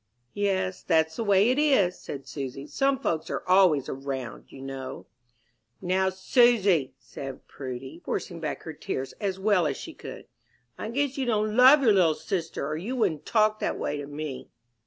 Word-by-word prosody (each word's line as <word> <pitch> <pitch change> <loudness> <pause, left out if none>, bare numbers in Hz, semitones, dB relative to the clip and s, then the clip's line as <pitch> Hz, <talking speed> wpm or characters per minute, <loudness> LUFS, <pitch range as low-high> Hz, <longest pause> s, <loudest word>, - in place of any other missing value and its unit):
"Yes, 190 -2 -1
that's 160 -2 +1
the 230 - -1
way 205 +2 +4
it 260 - +1
is," 235 -12 +3
said 140 -1 -7
Susy. 135 -1 -6
"Some 275 - +1
folks 165 - -2
are - - -4
always 180 -7 +4
round, 130 -4 -5
you - - -11
know." 135 -1 -7 0.7
"Now, 190 +1 +1
Susy," 190 - +3
said 135 -1 -9
Prudy, 130 +4 -7
forcing 170 -2 -4
back 155 -2 -4
her 160 - -6
tears 135 -2 -4
as 195 -2 -1
well 190 -4 +2
as 140 - -2
she - - -8
could, - - -9 0.5
"I 220 - -5
guess 275 +2 -1
you 260 - -1
don't 215 -2 +1
love 265 +4 +8
your 225 -4 +6
little 170 -5 +4
sister, 165 -2 -3
or 155 +1 -2
you 215 +11 -4
wouldn't 165 - 0
talk 215 -1 +3
that - - -1
way 145 - -2
to 145 -1 -6
me." 145 -3 -6
180 Hz, 180 wpm, -27 LUFS, 140-215 Hz, 0.7 s, love